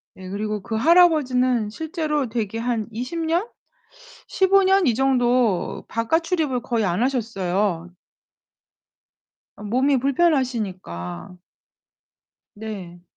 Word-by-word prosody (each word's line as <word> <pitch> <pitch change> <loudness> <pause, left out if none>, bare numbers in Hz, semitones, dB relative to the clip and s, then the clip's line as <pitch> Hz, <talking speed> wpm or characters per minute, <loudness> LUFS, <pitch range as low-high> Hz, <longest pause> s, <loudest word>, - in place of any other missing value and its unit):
네, 185 0 -10
그리고 210 +1 -3
그 220 - -5
할아버지는 255 -6 +3
실제로 305 - -2
대개 225 -1 -3
한 230 -2 -2
20 250 +9 -5
년? 340 +7 0 0.8
15 390 +1 +3
년 385 0 +3
이 240 - +3
정도 245 -5 +1
바깥 230 +9 0
출입을 315 -8 -1
거의 230 -3 -1
안 180 +3 0
하셨어요. 195 -8 -1 1.7
어 - - -12
몸이 260 +6 +2
불편하시니까. 220 - -1 1.2
네. 195 -5 -8
240 Hz, 195 characters per minute, -22 LUFS, 210-295 Hz, 1.7 s, 할아버지는